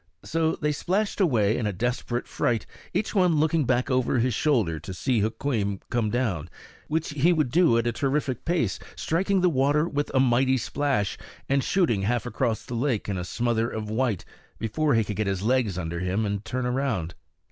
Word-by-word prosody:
So 160 0 0
they 150 -1 -1
splashed 200 +8 -1
away 115 - +3
in 110 - -1
a - - 0
desperate 120 +4 -2
fright, 115 -3 0 0.3
each 200 +4 -1
one 180 -5 +3
looking 155 0 +2
back 125 +3 +1
over 130 0 +2
his 120 +1 +1
shoulder 110 - +1
to 85 +5 -7
see 125 +4 +1
Hukweem 105 -2 -1
come 115 -3 +1
down, 105 - -1 0.4
which 160 +1 -1
he 150 +4 +3
would 155 -7 +1
do 165 -6 +4
at 115 - +1
a 120 - +2
terrific 135 +1 -1
pace, 175 0 0 0.2
striking 190 +3 +1
the 180 - +4
water 145 +2 +2
with 145 -2 -2
a - - +5
mighty 130 +1 +3
splash, 130 -5 -1 0.3
and 140 0 +2
shooting 165 - +2
half 115 +3 0
across 115 -2 -1
the - - -7
lake 120 -2 0
in 100 -2 -2
a - - -3
smother 115 +4 0
of 110 -2 -5
white, 115 -4 0 0.3
before 140 +6 0
he 115 - +3
could 105 -1 -5
get 110 -1 0
his 95 -1 -1
legs 115 -5 +1
under 85 -1 -3
him 95 +4 0
and 100 0 -2
turn 130 0 -2
around. 125 -10 -1
125 Hz, 195 wpm, -26 LUFS, 110-145 Hz, 0.4 s, a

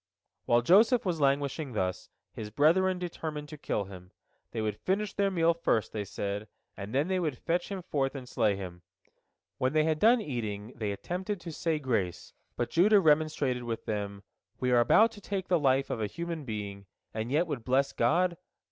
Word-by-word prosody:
While 120 0 +3
Joseph 220 - +5
was 170 -4 -1
languishing 140 0 +1
thus, 95 -3 -2 0.2
his 105 -1 -6
brethren 180 - +3
determined 160 -4 -5
to 155 - -7
kill 105 - -1
him. 90 -2 -11 0.4
They 115 - -5
would 110 -1 -2
finish 195 +1 -1
their 200 -1 +1
meal 170 -3 +3
first, 165 -9 0
they 105 -2 -3
said, 100 +2 -4 0.3
and 100 +1 -7
then 145 +4 +2
they 190 -1 +1
would 155 -7 -1
fetch 175 +1 -1
him 195 -3 -5
forth 140 -5 -1
and 130 -2 -7
slay 105 -4 +1
him. 90 -2 -7 0.8
When 130 +2 +1
they 155 -1 +4
had 155 -1 +1
done 235 +6 +6
eating, 115 - -4
they 105 -2 -2
attempted 185 - -4
to 170 - -6
say 160 0 -1
grace, 110 - -2 0.2
but 120 - -2
Judah 205 +5 +5
remonstrated 150 -6 +2
with 115 -1 -4
them: 100 -2 -4 0.4
"We 125 0 0
are 120 - +5
about 220 - +5
to 210 -2 -13
take 195 -2 -4
the 175 -2 +4
life 135 -1 +2
of 115 - -2
a 105 - 0
human 170 +3 -5
being, 100 -3 -5 0.3
and 110 +2 -3
yet 155 +5 +3
would 145 -8 -4
bless 135 +3 +1
God? 175 +1 +2
140 Hz, 190 wpm, -30 LUFS, 110-175 Hz, 0.8 s, done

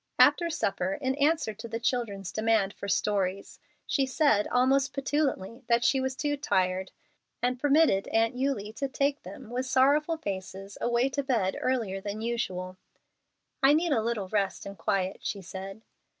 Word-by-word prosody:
After 340 -1 +5
supper, 195 - -1
in 260 -2 0
answer 295 -5 +2
to 220 +3 -9
the 230 0 -4
children's 225 -6 -2
demand 215 -3 +1
for 200 - -7
stories, 195 -1 -1 0.3
she 275 -2 +1
said 260 -6 +2
almost 265 +3 +2
petulantly 275 -6 -1
that 235 0 +3
she 270 - +3
was 260 0 -2
"too 290 +1 -1
tired," 185 -8 0 0.5
and 250 +1 0
permitted 290 -8 +3
Aunt 225 +1 +2
Eulie 250 -6 -2
to 275 - -1
take 280 +1 0
them 200 +4 -10
with 255 +2 -2
sorrowful 285 +5 +3
faces 195 -4 -6
away 240 +2 +2
to 280 +1 -1
bed 230 -9 0
earlier 225 -7 -1
than 205 +2 -5
usual. 185 -6 -3 0.8
"I 270 +2 +6
need 325 +2 +2
a 240 -6 +3
little 220 -4 -2
rest 200 -1 -1
and 200 - -7
quiet," 190 0 -1
she 200 -2 -4
said. 195 +4 -8
230 Hz, 165 wpm, -28 LUFS, 195-270 Hz, 0.8 s, I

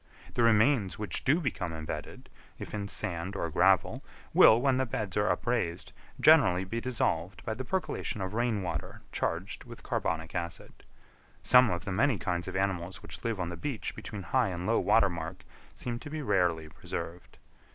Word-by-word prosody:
The - - 0
remains 115 -2 +4
which 105 -1 -3
do 145 +6 +3
become 105 - -2
embedded, 75 -1 -6 0.3
if - - -8
in 100 -1 -3
sand 95 -2 -2
or 85 -4 -2
gravel, 95 +1 +3 0.3
will, 110 - +8
when 130 0 +2
the 130 - +1
beds 105 -4 -3
are 105 0 +2
upraised, 95 -8 -1 0.3
generally 120 - +6
be 115 +5 -4
dissolved 95 -8 -1
by 110 - -1
the 125 +4 -5
percolation 130 - -2
of 95 0 -3
rain 115 -3 0
water 85 -4 -5
charged 85 +5 -2
with - - -11
carbonic 80 0 -2
acid. 85 -2 -4 0.7
Some 125 -1 +7
of 90 -1 -2
the 95 - -3
many 115 +5 +2
kinds 85 0 -2
of - - -5
animals 95 -2 -2
which - - -9
live 115 -4 -1
on 90 -2 -2
the 85 - -5
beach 120 - -4
between 105 -3 -7
high 130 +2 +2
and 90 -1 -4
low 115 +3 +3
water 115 -3 +4
mark 85 -2 -6 0.3
seem 120 -1 -4
to 145 - -9
be 155 0 -4
rarely 90 - +1
preserved. 85 +3 -7
100 Hz, 180 wpm, -30 LUFS, 85-120 Hz, 0.7 s, will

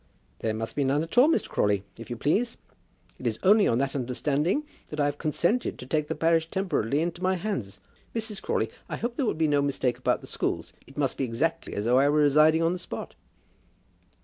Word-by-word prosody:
"There 110 -1 -1
must 115 +1 -4
be 145 - +1
none 140 +3 +1
at 165 - -7
all, 265 - +7
Mr. - - +1
Crawley, 100 -2 +1
if 115 - -10
you 120 - -3
please. 220 - 0 0.6
It - - -3
is - - -1
only 205 +2 +6
on 115 - +2
that 135 +1 0
understanding 140 - 0 0.2
that 150 - -7
I 145 - +3
have 145 0 -2
consented 170 +9 0
to - - -9
take 150 +3 0
the - - -2
parish 165 0 +2
temporarily 160 - 0
into 175 +1 -4
my 185 0 +2
hands. 150 - -4 0.4
Mrs. 220 -2 -2
Crawley, - - -1 0.2
I - - -3
hope 235 - -2
that 235 - -28
there 230 - +2
may - - -6
be 160 -1 +2
no 145 -1 +3
mistake 135 -3 0
about - - +1
the - - -10
schools. - - -3
It 135 - -16
must 140 -3 0
be - - +1
exactly 155 +8 -1
as 105 - -2
though 125 +2 +4
I 140 +1 +4
were 150 +1 +3
residing 155 +3 +5
on 165 +1 +2
the 180 - -4
spot." 180 - -6
150 Hz, 230 wpm, -27 LUFS, 135-175 Hz, 0.6 s, all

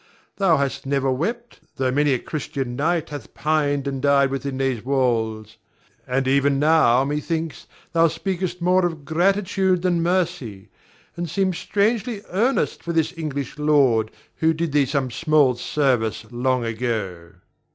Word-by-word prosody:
Thou 190 -5 +3
hast 140 -1 -2
never 135 -1 +1
wept, 230 - -3 0.2
tho' 130 -2 0
many 145 +2 +2
a - - 0
Christian 135 -3 -4
knight 165 +4 0
hath 145 -1 -9
pined 145 -2 0
and 135 -1 -3
died 140 -1 +3
within 135 0 -3
these 130 -4 -1
walls; 115 -5 -1 0.5
and 130 +1 0
even 140 +1 +3
now, 140 -4 +4
methinks, 150 -1 -3 0.3
thou 165 0 +5
speakest 180 +1 -3
more 180 +1 +3
of 160 -5 -2
gratitude 185 +2 +1
than 175 -2 +1
mercy, 170 - -1 0.5
and 175 -1 -4
seem 190 +3 0
strangely 210 +4 -1
earnest 230 +9 0
for 170 - -4
the 160 +1 +1
English 150 -3 -5
lord 135 -7 +3 0.3
who 160 0 +2
did 165 -1 -2
thee 140 -2 +3
some 135 -2 -1
small 150 -1 +3
service 120 -4 0
long 125 0 0
ago. 110 -7 -3
145 Hz, 145 wpm, -22 LUFS, 130-170 Hz, 0.5 s, thou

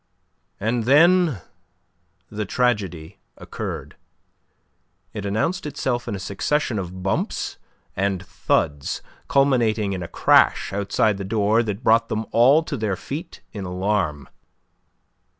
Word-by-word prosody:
And 115 +2 -1
then 160 - +5 0.9
the 105 0 -3
tragedy 100 -6 -1 0.2
occurred. - - -6 1.2
It 105 -2 -4
announced 130 - -1
itself 125 -4 -2
in - - -2
a - - -5
succession 105 +6 -1
of 95 0 -6
bumps 95 - -2 0.4
and 95 -1 -1
thuds, 70 -4 -1 0.2
culminating 115 -7 +2
in 95 - -4
a 85 - -5
crash - - +3
outside 100 +1 +1
the - - -3
door 105 +2 +2
that 105 -1 -4
brought 115 +1 +4
them 110 0 -2
all 135 +7 +5
to 150 -3 -4
their 105 -4 -1
feet 150 - -7
in 100 - -6
alarm. 90 -5 -1
105 Hz, 120 wpm, -23 LUFS, 95-125 Hz, 1.2 s, then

